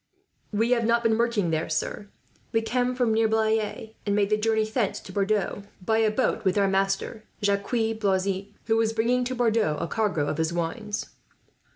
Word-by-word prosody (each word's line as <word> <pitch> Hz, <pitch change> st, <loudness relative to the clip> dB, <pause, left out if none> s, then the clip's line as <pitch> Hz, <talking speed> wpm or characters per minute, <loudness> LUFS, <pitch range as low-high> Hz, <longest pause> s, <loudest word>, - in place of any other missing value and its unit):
"We 225 Hz, +3 st, +1 dB
have 235 Hz, -2 st, +3 dB
not 235 Hz, +1 st, +2 dB
been 225 Hz, -1 st, +3 dB
working 230 Hz, -7 st, +1 dB
there, 160 Hz, 0 st, -1 dB
sir. 180 Hz, +5 st, -3 dB, 0.4 s
We 225 Hz, 0 st, +1 dB
come 250 Hz, +2 st, 0 dB
from 245 Hz, -3 st, +2 dB
near 225 Hz, 0 st, +3 dB
Blaye, 220 Hz, 0 st, 0 dB
and 205 Hz, -1 st, 0 dB
made 205 Hz, 0 st, +1 dB
the -, -, +5 dB
journey 220 Hz, +1 st, +1 dB
thence 215 Hz, -1 st, -1 dB
to -, -, -11 dB
Bordeaux 200 Hz, +1 st, 0 dB, 0.2 s
by 220 Hz, +4 st, +1 dB
a 220 Hz, -1 st, +4 dB
boat 235 Hz, +5 st, 0 dB
with 190 Hz, 0 st, +1 dB
our 200 Hz, -1 st, +4 dB
master, 195 Hz, +3 st, -1 dB, 0.2 s
Jacques 200 Hz, 0 st, +1 dB, 0.3 s
Blazin, 195 Hz, -1 st, 0 dB, 0.2 s
who 225 Hz, -1 st, +2 dB
was 225 Hz, 0 st, +2 dB
bringing 240 Hz, +3 st, +2 dB
to 255 Hz, +1 st, -2 dB
Bordeaux 225 Hz, -9 st, +2 dB
a -, -, -1 dB
cargo 195 Hz, -6 st, 0 dB
of 145 Hz, -, -2 dB
his 160 Hz, +1 st, +1 dB
wines." 205 Hz, +6 st, -3 dB
215 Hz, 190 wpm, -26 LUFS, 195-225 Hz, 0.4 s, the